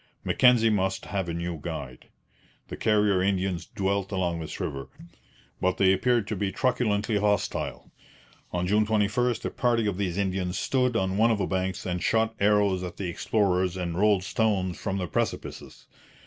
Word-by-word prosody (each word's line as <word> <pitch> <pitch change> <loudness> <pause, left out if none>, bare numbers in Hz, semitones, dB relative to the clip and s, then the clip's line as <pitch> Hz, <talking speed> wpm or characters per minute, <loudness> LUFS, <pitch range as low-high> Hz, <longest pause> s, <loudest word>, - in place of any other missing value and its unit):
Mackenzie 120 -3 +4
must 95 -2 0
have 95 -4 -3
a - - -2
new 85 -1 -4
guide. 60 -3 -7 0.6
The - - -5
Carrier 105 -3 +2
Indians 95 -3 -1
dwelt 100 0 -2
along 90 -3 -1
this 75 -2 -6
river, 70 -1 -4 0.7
but 95 0 +1
they 95 -1 +5
appeared 115 +2 +1
to 110 - -1
be 95 0 -1
truculently 110 -4 0
hostile. 75 -10 -1 0.6
On 90 0 -1
June 105 +4 +3
21 110 +3 +1
a - - 0
party 120 -2 +1
of 100 -2 -1
these 95 -3 -1
Indians 95 -2 -1
stood 125 -2 +1
on 95 -3 0
one 115 +2 +4
of 110 - +2
the 100 - 0
banks 95 0 -2
and 90 -1 -2
shot 115 0 +1
arrows 100 -2 +3
at 90 -2 -6
the 95 -3 -3
explorers 95 -1 0
and 85 -2 -3
rolled 100 0 +3
stones 95 -3 0
from 95 -1 -2
the 90 - -2
precipices. 85 - -4
95 Hz, 170 wpm, -27 LUFS, 90-105 Hz, 0.7 s, they